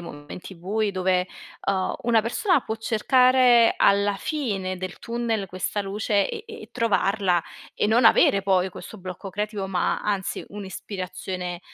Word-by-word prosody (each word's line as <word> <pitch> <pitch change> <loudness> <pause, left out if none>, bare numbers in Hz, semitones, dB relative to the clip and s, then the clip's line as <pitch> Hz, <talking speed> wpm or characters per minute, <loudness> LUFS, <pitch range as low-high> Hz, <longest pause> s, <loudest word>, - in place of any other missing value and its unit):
momenti 160 +3 -9
bui 200 +4 -2
dove, 185 -1 +1 0.4
uhm, 190 -1 0
una 230 -2 +3
persona 315 - +1
può 220 - -3
cercare 245 +1 +4
alla 200 0 +3
fine 195 - -3
del 185 -1 -6
tunnel 230 -3 -2
questa 185 +3 -3
luce, 200 +1 0
e 450 -2 -7
e 445 0 -10
trovarla 200 -6 +1 0.3
e - - +1
non 225 +2 +4
avere 200 -2 +5
poi 190 -1 +1
questo 220 - -10
blocco 185 0 -8
creativo, 205 0 -3
ma, 185 -2 0
anzi, 200 -2 -2
un'ispirazione, 185 -2 -6
200 Hz, 140 wpm, -24 LUFS, 185-225 Hz, 0.4 s, avere